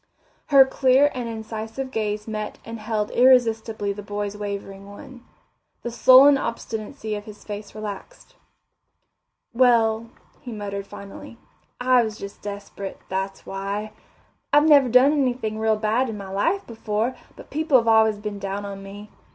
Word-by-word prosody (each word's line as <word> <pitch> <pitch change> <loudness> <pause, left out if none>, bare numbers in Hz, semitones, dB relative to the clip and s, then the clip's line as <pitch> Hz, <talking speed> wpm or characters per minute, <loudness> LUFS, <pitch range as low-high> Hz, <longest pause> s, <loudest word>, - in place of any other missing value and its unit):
Her 275 -3 +7
clear 265 +2 +3
and 245 -2 -4
incisive 225 +3 -6
gaze 210 -1 -2
met 215 -1 -5
and 230 0 -7
held 215 -1 -2
irresistibly 225 -5 +3
the 205 - -8
boy's 205 0 -4
wavering 200 -1 -6
one. 240 +4 -12 0.6
The 240 - -4
sullen 260 +4 +7
obstinacy 220 0 -5
of 205 0 -5
his 210 -1 -12
face 205 0 -8
relaxed. 215 - -8 1.2
"Well," 230 -2 +3 0.3
he 245 - -9
muttered 200 -2 -5
finally, 200 +3 -11 0.4
"I 250 0 +4
was 220 -2 -3
just 200 0 -9
desperate, 200 -1 -7
that's 190 +1 -4
why. 200 +2 -4 0.6
I've 295 +1 +5
never 285 -4 +6
done 255 +4 +6
anything 245 -6 -1
real 220 0 +2
bad 225 +4 0
in 220 - -5
my 195 -1 -8
life 330 - 0
before, 225 +2 -2 0.2
but - - -14
people 305 -2 +3
have 230 -2 0
always 220 -1 +4
been 210 -1 -6
down 200 +1 -4
on 195 -1 -7
me. 200 +2 -11
220 Hz, 150 wpm, -23 LUFS, 205-250 Hz, 1.2 s, Her